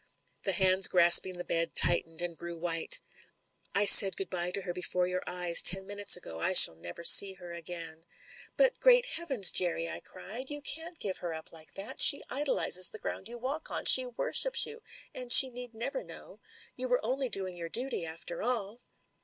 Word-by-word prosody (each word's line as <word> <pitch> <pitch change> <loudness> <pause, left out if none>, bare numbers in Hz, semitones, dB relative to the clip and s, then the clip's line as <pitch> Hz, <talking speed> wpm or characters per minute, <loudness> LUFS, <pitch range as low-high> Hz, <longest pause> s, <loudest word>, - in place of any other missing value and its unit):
The 195 - -4
hands 190 +1 +2
grasping 175 +1 +3
the 175 - -9
bed 165 0 -5
tightened, 165 -1 0
and 175 -1 -8
grew 170 +1 -12
white. 165 -1 0 0.7
"I 200 - +1
said 195 -1 +7
'Good 195 - -9
bye' 175 -1 -5
to 190 +2 -6
her 180 -2 -8
before 180 0 -4
your 180 0 -7
eyes, 180 -1 +3
ten 190 +1 +3
minutes 205 -1 -1
ago. 80 - -12
I 185 - -2
shall 85 - +7
never 85 - -14
see 195 +3 +6
her 175 -2 -15
again." 165 -1 -11 0.5
"But, - - -1
Great - - +1
Heavens, 275 - -1
Jerry!" 170 -2 -2
I - - -4
cried, 250 +6 -9
"you 290 0 -8
can't 325 +4 -4
give 195 -8 -6
her 170 -2 -9
up 160 - -13
like 160 -1 -9
that 195 +2 -5
She 280 - +6
idolises 260 -10 +3
the - - -8
ground - - -9
you 235 - -13
n8 - - -21
MEN, - - -25
WOMEN 270 +3 -5
AND 315 - -23
GUNS - - -4
walk - - -4
on, - - -9
she 255 - +7
worships 375 - +1
you, 455 +1 -14 0.3
and 250 -1 -9
she 260 +1 +8
need 245 -1 -11
never 370 - -8
know. - - -14 0.4
You 255 0 -7
were 245 -3 -4
only 260 +2 -5
doing 190 -4 -4
your 170 -1 -11
duty 245 -1 -6
after 165 +1 -7
all." 230 -1 -4
190 Hz, 210 wpm, -26 LUFS, 175-250 Hz, 0.7 s, she